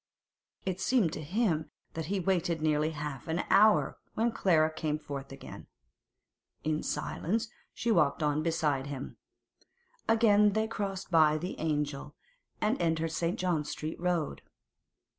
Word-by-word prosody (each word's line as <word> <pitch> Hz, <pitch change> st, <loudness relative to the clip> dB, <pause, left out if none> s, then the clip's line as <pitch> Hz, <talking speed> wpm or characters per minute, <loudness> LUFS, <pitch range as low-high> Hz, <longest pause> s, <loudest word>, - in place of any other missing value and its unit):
It 190 Hz, 0 st, -2 dB
seemed 225 Hz, -11 st, +2 dB
to -, -, -5 dB
him 165 Hz, -1 st, 0 dB, 0.2 s
that 160 Hz, -2 st, -4 dB
he 200 Hz, -, -1 dB
had 185 Hz, -4 st, -2 dB
waited 175 Hz, -3 st, +1 dB
nearly 155 Hz, 0 st, +2 dB
half 145 Hz, -4 st, -6 dB
an 165 Hz, +2 st, 0 dB
hour 215 Hz, +1 st, +5 dB, 0.2 s
when 230 Hz, +2 st, +2 dB
Clara 160 Hz, -7 st, +3 dB
came 155 Hz, -1 st, -1 dB
forth 140 Hz, -3 st, -7 dB
again. 135 Hz, -, -10 dB, 1.0 s
In 155 Hz, 0 st, 0 dB
silence 220 Hz, +6 st, -2 dB, 0.2 s
she 235 Hz, -, -1 dB
walked 155 Hz, -5 st, +3 dB
on 150 Hz, 0 st, +1 dB
beside 150 Hz, -4 st, 0 dB
him. 140 Hz, -2 st, -6 dB, 0.9 s
Again 210 Hz, -2 st, +5 dB
they 220 Hz, +1 st, +1 dB
crossed 195 Hz, -4 st, -4 dB
by 155 Hz, -2 st, +5 dB
the 180 Hz, +4 st, -4 dB
'Angel' 150 Hz, -2 st, -2 dB, 0.4 s
and 215 Hz, +5 st, +1 dB
entered 165 Hz, -1 st, +1 dB
St. 165 Hz, +5 st, -1 dB
John 175 Hz, -6 st, 0 dB
Street 155 Hz, +1 st, -5 dB
Road. 175 Hz, -4 st, -1 dB
160 Hz, 140 wpm, -30 LUFS, 150-195 Hz, 1.0 s, hour